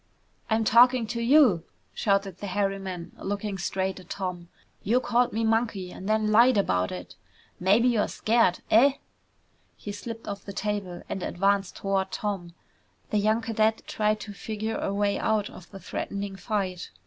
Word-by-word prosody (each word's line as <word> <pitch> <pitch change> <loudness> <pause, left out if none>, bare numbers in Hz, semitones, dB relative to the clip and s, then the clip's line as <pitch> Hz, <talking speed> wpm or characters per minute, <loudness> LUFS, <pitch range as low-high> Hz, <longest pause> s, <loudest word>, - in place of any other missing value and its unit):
"I'm 220 0 +2
talking 240 +2 +5
to 235 +2 -4
you!" 235 - +5 0.3
shouted 195 -3 0
the 205 - -5
hairy 195 +1 0
man, 185 -3 -6
looking 200 0 -3
straight 190 +1 -2
at 180 - -15
Tom. 180 -3 -5 0.3
"You 235 +6 +2
called 245 0 +1
me 225 +1 -1
Monkey 220 -5 0
and 190 - -7
then 215 0 +2
lied 235 +2 +6
about 90 - +1
it! 90 0 -7 0.5
Maybe 205 +7 +4
you're 225 -4 +2
scared, 220 -5 +2
eh?" 260 +5 +6 0.8
He 205 - -6
slipped 225 +2 -7
off 200 0 -5
the 200 - -8
table 200 -3 -3
and 190 - -4
advanced 195 +1 0
toward 195 -1 -1
Tom. 190 -5 -4 0.6
The 210 - +2
young 215 +2 +2
cadet 220 -1 +1
tried 215 0 0
to 205 - -7
figure 220 +2 -4
a - - -2
way 200 0 0
out 215 -2 0
of 180 - -13
the 195 - -10
threatening 200 0 -4
fight. 190 -4 -3
205 Hz, 165 wpm, -27 LUFS, 190-220 Hz, 0.8 s, lied